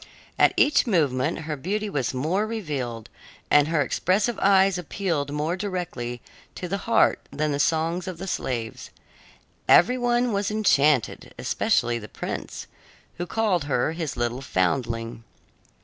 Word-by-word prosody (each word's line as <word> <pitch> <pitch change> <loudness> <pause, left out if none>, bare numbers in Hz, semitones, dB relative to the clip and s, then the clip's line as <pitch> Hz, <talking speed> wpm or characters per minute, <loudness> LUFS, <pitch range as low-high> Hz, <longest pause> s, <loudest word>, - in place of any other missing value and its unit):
At - - +5
each 290 -3 +4
moment 150 - +1
her 155 -1 -4
beauty 205 +9 -2
was 140 - -1
more 165 +11 -1
revealed, 140 - -4 0.4
and 145 0 +5
her 160 -2 +1
expressive 200 - 0
eyes 195 -1 +4
appealed 165 -5 -2
more 150 +4 -1
directly 175 -11 -4 0.3
to 180 - -5
the 195 +3 -2
heart - - +4
than 155 0 -1
the 140 - -1
songs 165 +4 0
of 185 -3 -5
the 190 - -6
slaves. 120 -10 -4 0.8
Every 250 +8 +6
one 240 -1 +1
was 200 0 0
enchanted, 150 - +2
especially 120 0 0
the 105 - -10
prince, - - -6 0.5
who 175 - -3
called 195 -6 0
her 135 0 0
his 160 -5 -4
little 120 +2 -2
foundling. 115 +1 -1
160 Hz, 140 wpm, -25 LUFS, 130-195 Hz, 0.8 s, Every